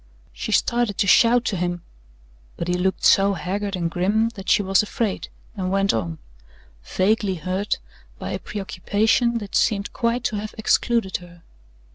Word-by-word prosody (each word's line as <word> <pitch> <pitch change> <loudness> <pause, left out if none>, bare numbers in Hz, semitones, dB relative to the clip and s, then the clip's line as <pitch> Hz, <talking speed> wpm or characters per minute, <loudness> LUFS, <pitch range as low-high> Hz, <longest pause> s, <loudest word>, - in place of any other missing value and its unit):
She - - -5
started 235 -4 +1
to 205 - +2
shout 235 +5 +5
to 200 - 0
him, 175 -1 -2 0.7
but 170 - -3
he 180 - +1
looked 185 +1 0
so 200 0 +5
haggard 200 +2 -3
and 170 -2 -1
grim 205 +7 +1
that 200 -5 -8
she 210 - +4
was 190 0 +3
afraid, 210 -1 -2 0.3
and 185 -3 -2
went 195 +1 +2
on, 85 -7 -2 0.7
vaguely 195 - +1
hurt 185 +5 -2 0.4
by - - -5
a - - -3
preoccupation 210 +4 0
that 205 -4 -6
seemed 200 -3 +1
quite 235 0 0
to 215 - -1
have 210 +1 -6
excluded 220 -2 +1
her. 175 -1 -16
200 Hz, 160 wpm, -23 LUFS, 185-220 Hz, 0.7 s, shout